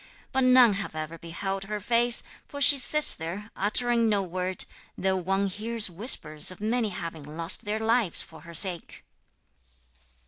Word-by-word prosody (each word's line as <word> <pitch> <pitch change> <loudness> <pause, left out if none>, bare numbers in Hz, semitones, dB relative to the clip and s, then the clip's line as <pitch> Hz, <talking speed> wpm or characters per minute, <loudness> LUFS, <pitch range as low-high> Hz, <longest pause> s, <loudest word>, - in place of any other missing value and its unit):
But 265 0 +1
none 250 -3 +6
have 195 -4 -5
ever 155 +1 -6
beheld 195 +3 -5
her 210 +1 -5
face, 235 +3 +2 0.2
for 285 - -9
she 285 0 +7
sits 300 +4 +3
there, 190 +7 -7
uttering 230 +3 +2
no 205 -2 +1
word, 185 +1 -3 0.3
though 190 0 0
one 195 +2 -1
hears 215 +1 +1
whispers 160 - 0
of 185 - -5
many 220 +1 -1
having 160 -4 -8
lost 165 +4 -1
their 210 +1 -2
lives 220 -4 +1
for 160 - -15
her 170 +1 -13
sake.' 180 -3 +1
200 Hz, 160 wpm, -26 LUFS, 170-230 Hz, 0.3 s, she